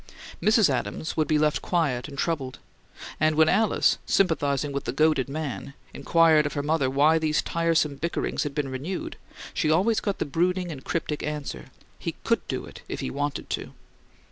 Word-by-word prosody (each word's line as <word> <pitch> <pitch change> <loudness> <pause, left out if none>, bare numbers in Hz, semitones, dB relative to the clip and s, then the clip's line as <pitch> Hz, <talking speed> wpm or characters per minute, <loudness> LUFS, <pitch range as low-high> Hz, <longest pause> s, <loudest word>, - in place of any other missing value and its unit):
Mrs. 215 -1 +5
Adams 130 +2 -2
would 155 -1 +1
be 155 - +3
left 150 0 +2
quiet 155 -8 0
and 140 -2 -10
troubled; 135 -5 -2 0.6
and 155 0 +3
when 160 0 +5
Alice, 215 +5 +3
sympathizing 145 -6 +1
with 140 0 -3
the - - -1
goaded 150 -1 +2
man, 140 -3 -5 0.2
inquired 155 +1 +4
of - - -6
her 145 - -2
mother 150 -3 +1
why 150 +4 +4
these 155 -1 +1
tiresome 165 -4 +1
bickerings 170 +4 -2
had 145 -2 -3
been 145 -2 -1
renewed, 145 +8 -4 0.4
she 155 - 0
always 195 +8 +3
got 200 -2 -2
the - - -1
brooding 175 +4 0
and 135 -4 -8
cryptic 155 -3 -2
answer, 150 -1 -4 0.3
"He - - -4
COULD - - 0
do - - -3
it - - -12
if - - -4
he - - -3
wanted 145 0 -3
to." - - -4
155 Hz, 180 wpm, -26 LUFS, 140-165 Hz, 0.6 s, Mrs